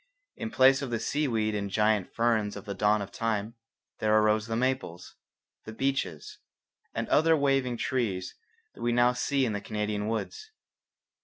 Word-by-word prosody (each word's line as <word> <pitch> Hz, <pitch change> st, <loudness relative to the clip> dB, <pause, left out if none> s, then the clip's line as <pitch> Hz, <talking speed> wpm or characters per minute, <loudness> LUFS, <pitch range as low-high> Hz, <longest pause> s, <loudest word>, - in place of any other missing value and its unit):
In 230 Hz, -, -5 dB
place 135 Hz, -6 st, +5 dB
of 135 Hz, -, -4 dB
the 115 Hz, -1 st, -1 dB
seaweed 115 Hz, -4 st, 0 dB
and 100 Hz, -1 st, -2 dB
the -, -, -12 dB
giant 105 Hz, -2 st, +2 dB
ferns 110 Hz, -3 st, +1 dB
of 100 Hz, 0 st, -8 dB
the 100 Hz, -, -4 dB
dawn 105 Hz, +2 st, +2 dB
of 100 Hz, -, -10 dB
time 110 Hz, 0 st, -2 dB, 0.5 s
there 110 Hz, 0 st, +3 dB
arose 110 Hz, 0 st, +2 dB
the 115 Hz, -, -2 dB
maples, 125 Hz, -8 st, -2 dB, 0.5 s
the 110 Hz, -, -7 dB
beeches, 135 Hz, -, -2 dB, 0.6 s
and -, -, -2 dB
other 160 Hz, +1 st, +4 dB
waving 135 Hz, -4 st, +1 dB
trees 105 Hz, -9 st, -2 dB, 0.4 s
that -, -, -14 dB
we 120 Hz, 0 st, +1 dB
now 120 Hz, +1 st, +4 dB
see 135 Hz, +2 st, 0 dB
in 110 Hz, -, -1 dB
the 100 Hz, -, -3 dB
Canadian 105 Hz, 0 st, -3 dB
woods. 115 Hz, -, -4 dB
115 Hz, 170 wpm, -28 LUFS, 105-130 Hz, 0.6 s, place